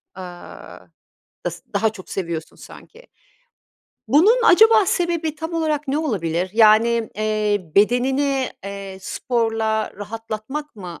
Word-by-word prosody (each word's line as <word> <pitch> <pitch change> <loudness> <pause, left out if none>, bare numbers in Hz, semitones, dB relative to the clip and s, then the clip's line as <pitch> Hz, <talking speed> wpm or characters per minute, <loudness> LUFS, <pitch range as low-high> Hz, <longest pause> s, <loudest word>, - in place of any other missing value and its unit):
aaa, 180 -2 -10 0.7
s - - -10
daha 215 +2 +2
çok 210 -4 -12
seviyorsun 170 -4 -5
sanki. 475 +3 -15 1.0
Bunun 355 - +5
acaba 440 +1 +6
sebebi 340 -4 -1
tam 320 +2 -6
olarak 310 -3 -1
ne 280 +3 0
olabilir? 185 - -2
Yani, 225 +1 +4
eee, 210 -4 -1
bedenini, 260 +5 +2
eee, 200 -1 -7
sporla 225 0 -1
rahatlatmak 225 +7 -6
mı 180 -4 -9
225 Hz, 110 wpm, -21 LUFS, 200-300 Hz, 1.0 s, acaba